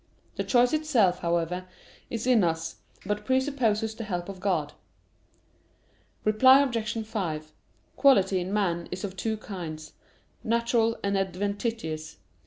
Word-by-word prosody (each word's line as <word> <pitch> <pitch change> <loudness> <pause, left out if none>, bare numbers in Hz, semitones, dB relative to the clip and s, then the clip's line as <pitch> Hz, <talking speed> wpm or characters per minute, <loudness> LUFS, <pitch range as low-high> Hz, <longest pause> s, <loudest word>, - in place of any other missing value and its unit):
The - - -2
choice 245 +1 +3
itself, 245 -13 +2
however, 170 +2 -1 0.4
is 230 -1 -3
in 245 -5 +4
us, 165 -1 -1 0.3
but 210 +1 -2
presupposes 245 -4 +1
the 225 +1 -6
help 180 -3 -4
of 195 -2 -7
God. 175 -7 -1 1.5
Reply 260 +6 +6
Obj. 230 -4 -2
5: 160 -8 -4 0.5
Quality 195 -9 +4
in 180 +2 -4
man 175 -5 0
is 185 +2 -6
of 195 -2 -4
two 220 +4 -2
kinds: 160 -7 -7 0.5
natural 230 0 +1
and 200 0 0
adventitious. 195 -3 -3
205 Hz, 125 wpm, -27 LUFS, 180-230 Hz, 1.5 s, Reply